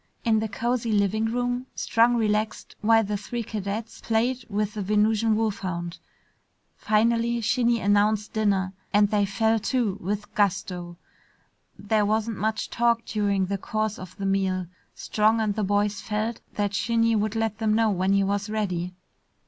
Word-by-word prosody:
In 220 -2 +3
the 220 - -1
cozy 235 +2 -1
living 210 +1 +2
room, 245 +2 -1
Strong 235 +1 +3
relaxed 215 -1 -1
while 225 +1 +4
the 205 0 -2
three 235 +3 -4
cadets 215 +1 -5
played 235 +3 0
with 210 0 -1
the 210 - -4
Venusian 215 +2 +2
wolfhound. 185 -6 -2 0.8
Finally 230 +2 +1
Shinny 235 +1 +2
announced 205 +1 +2
dinner 195 -3 +1 0.2
and 205 0 +4
they 205 -1 +3
fell 220 +3 +1
to 220 -3 -1
with 205 +3 -4
gusto. 180 -3 -1 0.8
There 210 +1 +1
wasn't 220 0 0
much 220 +2 -1
talk 235 -1 +2
during 200 -3 0
the 195 +1 -3
course 215 +1 -2
of 185 -1 -10
the 195 - -4
meal. 190 -1 0 0.3
Strong 220 +1 +1
and 215 -2 +1
the 215 +1 -2
boys 205 +1 0
felt 215 +2 -3
that 205 -1 -1
Shinny 230 +2 +2
would 215 +1 0
let 225 -1 -1
them 215 -1 +2
know 225 -1 +3
when 190 0 +1
he 200 0 +3
was 200 +1 -1
ready. 185 -4 -2
215 Hz, 155 wpm, -25 LUFS, 200-225 Hz, 0.8 s, while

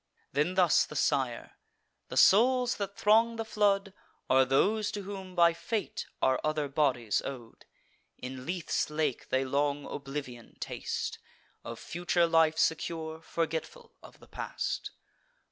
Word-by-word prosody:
Then 150 +7 +1
thus 180 -4 +5
the 150 - -9
sire: 135 -4 -1 0.5
"The - - -5
souls 245 +4 +5
that 200 0 -5
throng 225 +2 +4
the 225 0 -4
flood 200 -2 +1 0.4
Are 130 0 +6
those 205 +11 +2
to 205 - -4
whom, 190 -2 -8
by 170 -1 +5
fate, 215 +6 -4 0.2
are 130 -1 +3
other 155 -1 0
bodies 135 -6 +1
ow'd: 120 -4 -9 0.5
In 125 0 -7
Lethe's 175 -3 -1
lake 150 -4 -2
they 130 +1 +1
long 145 +2 0
oblivion 135 -4 -7
taste, - - -4 0.4
Of - - -7
future 175 0 0
life 160 -1 +3
secure, 160 0 -1
forgetful 165 - -4
of - - -15
the - - -17
past. - - -4
160 Hz, 135 wpm, -30 LUFS, 140-195 Hz, 0.5 s, Are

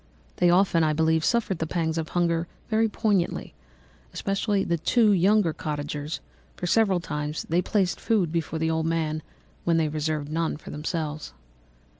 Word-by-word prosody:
They 175 - +4
often, 175 -2 +4
I 155 -1 +2
believe, 160 +1 +2
suffered 215 -6 +1
the 160 - -1
pangs 165 -1 -1
of 155 - -4
hunger 170 -1 +1 0.2
very 220 0 +2
poignantly, 205 -4 0 0.6
especially 195 0 0
the 170 -1 -1
two 220 +6 +4
younger 195 -2 +3
cottagers, 150 0 -4 0.3
for - - -5
several 195 -1 +3
times 150 -2 -4
they 170 +2 +3
placed 190 -2 0
food 200 -8 +1
before 165 -1 -2
the 160 0 0
old 160 0 0
man 155 -2 -1 0.4
when 170 -1 +2
they 160 -2 +2
reserved 155 -1 -2
none 165 -1 -1
for - - -10
themselves. 155 0 -4
165 Hz, 160 wpm, -26 LUFS, 155-190 Hz, 0.6 s, They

